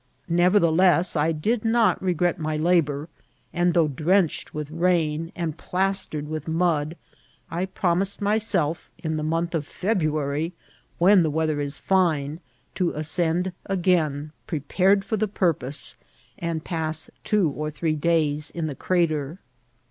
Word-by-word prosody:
Nevertheless, 175 0 +4
I 155 +1 +2
did 210 +9 -1
not 225 0 +3
regret 175 -1 0
my 155 -1 -2
labour; 155 -3 +1 0.5
and 175 0 +1
though 165 -3 +4
drenched 160 +5 +1
with 150 -1 -5
rain 165 -1 0
and 165 -3 -3
plastered 185 -5 -1
with 155 0 -5
mud, 160 -1 0 0.5
I 175 +3 -1
promised 185 +1 0
myself 205 -7 0
in 160 -2 -3
the 155 - -2
month 165 +2 -1
of 155 -3 -2
February, 155 -5 -1 0.4
when 190 +2 +6
the 160 - +1
weather 155 -1 0
is 140 0 +1
fine, 160 -5 +1 0.3
to 180 -3 0
ascend 170 +4 0 0.2
again, 165 -6 +1 0.2
prepared 190 +6 +1
for 215 +2 -1
the 215 +1 +1
purpose, 160 -8 -2 0.4
and 165 -2 -3
pass 160 -1 -2
two 205 -8 +2
or 150 +2 -4
three 155 +1 -1
days 150 -1 +1
in 165 -2 -4
the 155 - -3
crater. 160 -1 0
165 Hz, 135 wpm, -24 LUFS, 155-180 Hz, 0.5 s, when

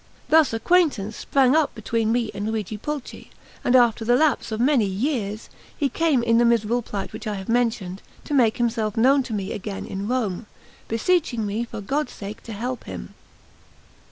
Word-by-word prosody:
Thus 315 -2 +5
acquaintance 225 - +2
sprang 270 0 +2
up 315 -2 +2
between 225 0 -1
me 235 -2 0
and 205 +2 -4
Luigi 220 -1 -3
Pulci; 285 +5 -6 0.3
and 250 - +3
so, 250 - +9
after 230 -1 -1
the 240 +2 +3
lapse 295 -4 +2
of 220 - -2
many 250 -4 +3
years, 210 0 -2 0.3
he 285 -3 +1
came, 310 -7 +1
in 230 0 +3
the - - +5
miserable 235 0 +2
plight 200 -4 -5
which 220 - -7
I 210 - -2
have 190 -1 -7
mentioned, 225 -6 0 0.2
to - - -4
make 235 -6 +3
himself 225 -3 -1
known 270 +5 +5
to 245 -3 -6
me 195 -2 -3
again 205 0 -5
in 195 +1 -5
Rome, 230 -4 -2 0.4
beseeching 240 -1 +1
me 210 +4 -2
for 225 - -7
God's 290 +9 -2
sake 205 +1 -8
to 230 - -7
help 245 +4 -4
him. - - -8
230 Hz, 185 wpm, -23 LUFS, 210-255 Hz, 0.4 s, so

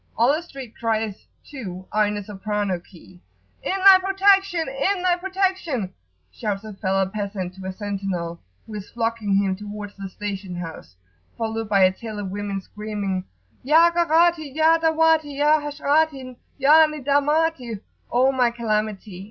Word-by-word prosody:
All 240 +5 +4
the 310 - -1
street 270 -9 -10
cries, 220 -3 -2 0.2
too, 190 -10 -8
are 210 0 +3
in 210 - -2
the 205 - -4
soprano 205 -2 -2
key. 175 0 -18 0.4
"In 385 - -1
thy 385 -1 +10
protection! 390 -2 +3
in 355 +8 -1
thy 360 -1 +3
protection!" 370 - -1 0.4
shouts 205 -3 -3
a 215 -1 -8
Fellah 195 -1 0
peasant 200 -3 -4
to 190 0 -8
a - - -2
sentinel, 190 -4 -4 0.2
who 220 - -11
is 205 -2 -7
flogging 225 -3 -1
him 195 -1 +2
towards 205 0 -8
the 195 -1 -7
station 195 -2 -5
house, 165 - -8 0.4
followed 225 -1 -3
by 195 -2 +4
a 185 - +6
tail 215 +2 -8
of 200 -2 -4
women, 200 -1 -3
screaming, 205 -2 -4 0.4
"Ya 325 +5 +5
Gharati 335 -2 +3
ya 320 +1 +4
Dahwati 320 -2 +2
ya 300 +2 +4
Hasrati 290 -2 0 0.2
ya 305 +3 +6
Nidamati 290 -4 0 0.3
O 255 +2 +4
my 250 -2 +2
calamity! 215 -4 -3
225 Hz, 150 wpm, -23 LUFS, 200-310 Hz, 0.4 s, thy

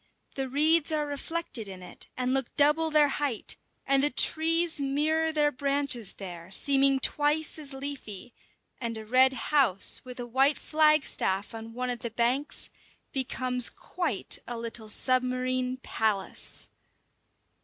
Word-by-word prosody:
The 270 -1 -3
reeds 310 +4 +3
are 305 -1 0
reflected 290 -5 -4
in 185 -2 -9
it - - -8
and 255 0 -1
look 270 -2 -1
double 300 +3 +3
their 305 -1 +4
height, 275 -5 -2 0.3
and 275 0 +4
the 290 - +7
trees 325 +4 +2
mirror 310 +4 0
their 300 -1 +2
branches 275 -5 0
there, 175 -3 -8
seeming 275 +6 +3
twice 300 +3 +1
as 295 -2 -2
leafy; 265 -5 -6 0.5
and 230 -2 -4
a 220 - -8
red 260 +3 +4
house 260 -9 +3
with 250 -1 -10
a 245 - -4
white 265 +4 +2
flagstaff 305 -11 +1
on 225 0 -9
one 250 0 -2
of 245 - -5
the 235 - -5
banks 245 +6 -1 0.4
becomes 255 -2 +1
quite 350 - -4
a 240 - -5
little 230 -1 -5
submarine 255 +1 0
palace. 220 -5 -1
265 Hz, 140 wpm, -28 LUFS, 235-295 Hz, 0.5 s, the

